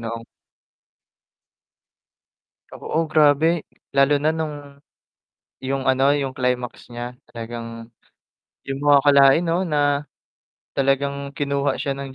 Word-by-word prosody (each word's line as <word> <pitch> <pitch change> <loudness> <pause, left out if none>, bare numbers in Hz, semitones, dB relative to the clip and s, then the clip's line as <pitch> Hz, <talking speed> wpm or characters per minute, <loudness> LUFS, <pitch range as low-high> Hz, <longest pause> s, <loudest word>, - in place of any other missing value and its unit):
noong 115 0 -6 2.5
Oo, 165 - -2
grabe. 155 +2 +3 0.2
Lalo 140 +1 +3
na 155 - +3
nung 160 -2 -3 1.1
yung 135 0 -3
ano, 130 +1 +3
yung 135 -2 -2
climax 125 -2 -3
niya. 120 +1 -6 0.2
Talagang 115 0 -8 0.7
di 135 - -6
mo 145 +1 +3
akalain 140 +1 +6
'no 175 +2 0
na 145 -2 +1 0.7
talagang 140 +1 0
kinuha 140 -1 -1
siya 140 - -2
ng 135 -1 -7
140 Hz, 105 wpm, -22 LUFS, 130-145 Hz, 2.5 s, akalain